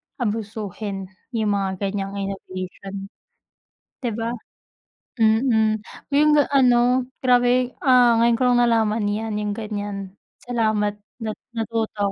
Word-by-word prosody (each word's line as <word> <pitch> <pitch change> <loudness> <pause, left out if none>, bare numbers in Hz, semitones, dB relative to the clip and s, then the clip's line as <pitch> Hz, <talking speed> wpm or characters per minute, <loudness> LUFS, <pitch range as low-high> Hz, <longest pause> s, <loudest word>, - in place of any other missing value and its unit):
abusuhin 205 - -4 0.2
yung 215 -2 +1
mga 195 -1 -1
ganiyang 195 0 -2
innovation, 195 0 -6 0.9
di 245 -3 -2
ba? 230 +1 -2 0.9
Mm, 220 -1 +3 0.3
yung 300 +1 +5 0.2
ano, 250 -1 +4 0.2
grabe, 250 0 +3
ah, 245 -3 +5
ngayon 235 0 +4
ko 255 - -1
lang 245 - +4
nalaman 220 -2 +2
yan, 210 0 -2
yung 210 -1 -2
ganiyan. 205 -3 -5 0.3
Salamat, 215 -4 0 0.2
nat 215 -1 -4 0.2
natuto 220 -2 -1
220 Hz, 110 wpm, -23 LUFS, 205-240 Hz, 0.9 s, yung